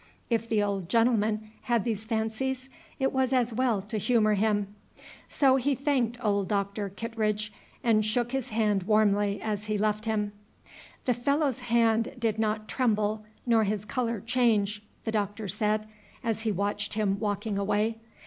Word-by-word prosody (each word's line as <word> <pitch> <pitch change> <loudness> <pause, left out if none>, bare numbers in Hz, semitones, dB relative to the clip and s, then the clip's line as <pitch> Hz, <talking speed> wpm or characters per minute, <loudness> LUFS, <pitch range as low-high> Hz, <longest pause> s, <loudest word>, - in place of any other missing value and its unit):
If 230 0 0
the 215 -2 +2
old 195 -4 -2
gentleman 220 -2 +2
had 235 -4 +1
these 220 -2 -2
fancies, 235 +4 -2 0.3
it 270 -1 0
was 260 -1 +1
as 245 -3 +2
well 235 -5 +1
to 215 +1 -3
humor 215 -1 +3
him. 205 -1 +1 0.6
So 270 -2 +4
he 270 +2 +1
thanked 255 -4 0
old 200 -2 +2
Doctor 200 0 -1
Kittredge, 215 0 -2 0.3
and 220 -3 +4
shook 235 +3 +1
his 265 -2 -2
hand 215 -3 +1
warmly 205 0 +2
as 215 -1 -3
he 215 -1 0
left 215 +1 0
him. 210 -2 0 0.7
"The 250 - +3
fellow's 280 +2 +1
hand 230 -1 +2
did 225 -3 0
not 215 0 0
tremble, 215 -3 0 0.2
nor 230 -2 +4
his 210 0 -1
color 235 -1 -1
change," 220 -3 +1 0.2
the 225 - -2
Doctor 205 0 -2
said, 215 +2 0 0.4
as 225 -2 -1
he 225 -1 0
watched 205 +1 -1
him 200 -2 +1
walking 205 -1 -1
away. 210 +3 0
220 Hz, 160 wpm, -28 LUFS, 210-235 Hz, 0.7 s, So